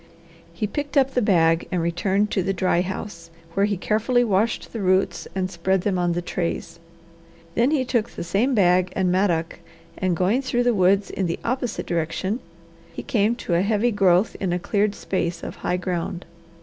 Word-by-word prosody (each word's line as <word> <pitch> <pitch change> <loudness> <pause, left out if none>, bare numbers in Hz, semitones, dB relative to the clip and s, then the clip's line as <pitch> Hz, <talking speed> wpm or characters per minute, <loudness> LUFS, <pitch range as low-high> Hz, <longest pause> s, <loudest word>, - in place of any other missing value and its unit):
He 215 - -3
picked 285 +7 -3
up 270 -1 +4
the 250 - +1
bag 165 -6 +3
and 180 - 0
returned 190 +5 0
to 195 - +1
the 195 +2 -1
dry 175 -1 +2
house, 180 -2 -6 0.2
where 200 +2 +2
he 205 -2 -1
carefully 225 +6 +1
washed 215 0 0
the 225 - -4
roots 185 0 +1
and 185 -1 -1
spread 190 +2 0
them 185 -1 0
on 175 -1 +1
the 175 +1 -2
trays. 170 -1 -3 0.7
Then 235 +6 +3
he 285 -4 +1
took 235 -3 0
the - - -6
same 210 +10 +1
bag 180 -2 +3
and 185 -2 +1
mattock 175 -4 0 0.4
and 185 -3 0
going 195 +9 +2
through 245 -2 0
the 245 0 +3
woods 195 0 +2
in 190 - -1
the 170 - -2
opposite 245 -1 -2
direction 170 +6 -2 0.5
he - - -7
came 220 -1 +1
to 195 - -4
a 170 - +3
heavy 215 +4 +1
growth 195 -1 +3
in 190 -3 -1
a 175 - +1
cleared 205 +3 0
space 170 -3 -3
of - - -6
high 180 - -1
ground. 180 0 -3
190 Hz, 190 wpm, -23 LUFS, 175-215 Hz, 0.7 s, up